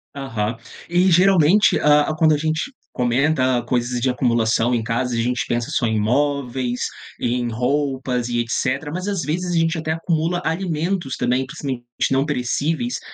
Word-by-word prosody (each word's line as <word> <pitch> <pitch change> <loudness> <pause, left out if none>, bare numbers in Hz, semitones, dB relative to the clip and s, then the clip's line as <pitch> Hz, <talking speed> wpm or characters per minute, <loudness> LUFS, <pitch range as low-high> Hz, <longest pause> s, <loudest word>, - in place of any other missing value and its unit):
Aham. 115 -5 -3 0.3
E 180 +2 +3
geralmente, 185 +1 +5
hã, 150 0 +4
quando 160 -1 +4
a 150 - +2
gente 155 - -2 0.2
comenta 130 0 +1
coisas 120 +1 -1
de 130 - +2
acumulação 120 -1 +1
em 115 - 0
casa 120 +2 -1
a 115 - -1
gente 125 +1 -1
pensa 120 0 -1
só 120 - 0
em 110 -1 0
móveis, 125 0 0 0.3
em 120 0 0
roupas 130 0 -1
e 120 -1 -1
etc. 130 +5 -1
Mas, 185 +4 -4
às 200 -4 -1
vezes, 175 +5 -2
a 170 - +1
gente 165 +1 +1
até 160 0 -2
acumula 165 +1 -1
alimentos 165 -2 -2
também, 125 +2 0
principalmente 130 -2 -5 0.3
não 135 +1 +2
perecíveis, 150 - -1
135 Hz, 160 wpm, -21 LUFS, 120-160 Hz, 0.3 s, geralmente